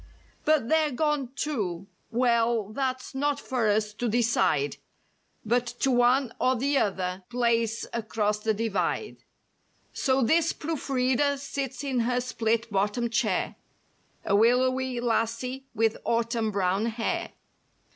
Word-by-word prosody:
But 305 -6 +3
they're 315 +1 +3
gone 295 -1 0
to—well, 230 - -1
that's 260 +2 -3
not 285 +1 0
for 250 -6 -1
us 210 0 +1
to 240 +2 -2
decide 195 - +1 0.7
But 240 +2 +1
to 270 - +3
one 245 +1 +3
or 260 +1 +3
the 275 +3 +1
other 185 -2 -1
place 230 -2 +1 0.2
'cross 210 -1 0
the 220 0 0
divide). 210 - -1 0.8
So 265 -1 +1
this 325 +7 +3
proof 315 -2 -5
reader 265 +2 +2
sits 275 -1 -4
in 265 -3 0
her 245 +2 +1
split 230 -2 -1
bottom 210 +4 0
chair, 225 -5 0 0.7
A 200 - +2
willowy 255 +3 +2
lassie 240 +3 -1
with 225 0 +2
Autumn 230 -1 0
brown 195 +1 0
hair. 230 0 -2
235 Hz, 125 wpm, -27 LUFS, 220-260 Hz, 0.8 s, But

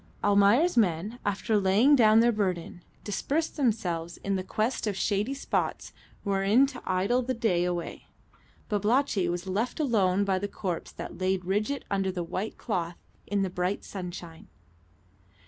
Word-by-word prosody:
Almayer's 205 - +4
men, 205 +3 +1
after 205 +1 0
laying 205 +9 +5
down 220 -3 +6
their 240 +1 +4
burden, 185 -5 -2 0.2
dispersed 285 +10 -2
themselves 180 - -1
in 195 -1 0
quest 220 +1 -1
of 200 -2 -2
shady 210 +7 0
spots 275 - -2 0.3
wherein 200 +6 +3
to 270 -2 -7
idle 195 +7 +1
the 255 +1 -2
day 205 -7 +1
away. 175 -1 -4 0.6
Babalatchi 210 -2 +1
was 175 +1 -3
left 205 +9 -2
alone 200 -9 +2
by 190 -1 +1
the 205 - -2
corpse 185 -4 -4
that - - -8
laid 185 -1 0
rigid 215 +9 -1
under 195 -1 0
the 180 -1 -3
white 190 +5 -4
cloth 175 -6 -3 0.3
in 200 -1 0
the 190 - -1
bright 180 +3 -2
sunshine. 175 -3 -8
200 Hz, 145 wpm, -28 LUFS, 185-230 Hz, 0.6 s, down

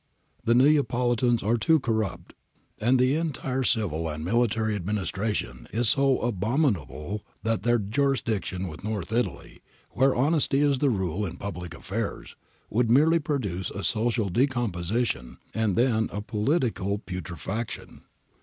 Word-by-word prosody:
The 115 - +3
Neapolitans 125 -3 +3
are 115 +4 +2
too 160 +7 +3
corrupt 110 -6 -2 0.5
and 125 +4 +3
the 130 +2 +3
entire 140 -5 -1
civil 95 - +1
and 75 +1 -5
military 110 0 +1
administration 95 - -2
is 115 +1 +1
so 135 0 +3
abominable 105 - -1 0.2
that 115 0 0
their 120 +3 +3
junction 110 -5 -1
with 80 +1 -9
North 105 -3 -3
Italy, 120 +1 -2 0.3
where 135 +1 +3
honesty 145 +1 +2
is 140 -3 +3
the 145 - +3
rule 95 -3 -1
in 90 -3 -4
public 90 -3 -6
affairs, 100 +6 -5 0.3
would 115 +1 +1
merely 155 +7 +5
produce 105 - -2
a 100 - -6
social 110 +2 +1
decomposition 110 - -1 0.2
and 110 -4 +1
then 115 -2 +2
a 105 - -3
poli 110 +9 +1
tical 100 - -1
putrefaction.' 90 +5 -5
110 Hz, 135 wpm, -26 LUFS, 95-125 Hz, 0.5 s, merely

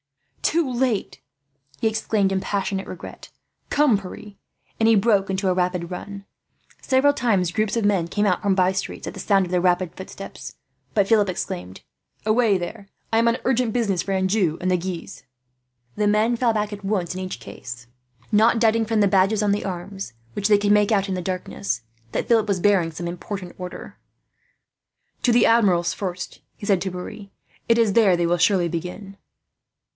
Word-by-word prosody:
"Too 330 -2 +1
late!" 245 -4 -1 0.6
he - - +1
exclaimed, 215 -2 0
in 190 0 0
passionate 195 -1 -2
regret. - - -9 0.4
"Come, 285 -8 +3
Pierre," 200 +2 -10 0.5
and 225 0 +4
he 225 - +6
broke 200 -2 +3
into 190 +1 -1
a 185 - +3
rapid 180 -1 -1
run. 200 +2 -7 0.6
Several 275 +2 +3
times 205 -10 +1
groups 215 +3 0
of 225 - 0
men 195 -5 +2
came 205 +4 0
out 185 -3 +1
from 200 -2 +2
bye 185 -1 +3
streets 190 - -4
at - - -5
the - - -9
sound 195 -2 +2
of 175 - -8
the 180 -1 +2
rapid 180 -1 +1
footsteps, 195 +1 -9 0.4
but 200 -2 +3
Philip 210 -3 +3
exclaimed: 90 - -5 0.4
"Away 215 -2 +3
there! 195 +3 -7 0.2
I 225 - +5
am 230 - +3
on 235 +1 +2
urgent 250 -2 +2
business 205 -7 +1
for 195 - -4
Anjou 190 -3 +1
and 185 - -1
Guise." 180 -7 -6 0.7
The 210 - +1
men 215 +3 +3
fell 235 0 +2
back 210 -1 -1
at 205 0 -8
once, 195 -4 -1
in 185 - -5
each 185 0 -5
case, 120 -1 -9 0.4
not 225 +2 +4
doubting 225 0 +3
from 220 0 0
the 200 - +5
badges 195 +2 +3
on 205 - +2
the 205 - 0
arms, 190 - -6 0.2
which 200 - 0
they 210 -1 +5
could 205 0 +1
make 210 +1 +4
out 200 -2 +2
in 190 - -2
the 180 - -3
darkness, 115 - -3 0.3
that - - -2
Philip 225 -2 +3
was 200 -3 0
bearing 180 -4 +3
some 170 +2 -5
important 180 +1 -6
order. 180 0 -8 1.2
"To 245 - +3
the 235 0 +5
Admiral's, 190 -7 +3
first," 185 -2 -5 0.2
he - - -8
said 195 -3 +2
to 190 +1 -2
Pierre. 185 +3 -8 0.4
"It 230 - +5
is 225 -4 +3
there 200 -6 +5
they 170 - +1
will 175 +1 +2
surely 180 0 +3
begin." 180 +4 -6
200 Hz, 190 wpm, -23 LUFS, 180-220 Hz, 1.2 s, he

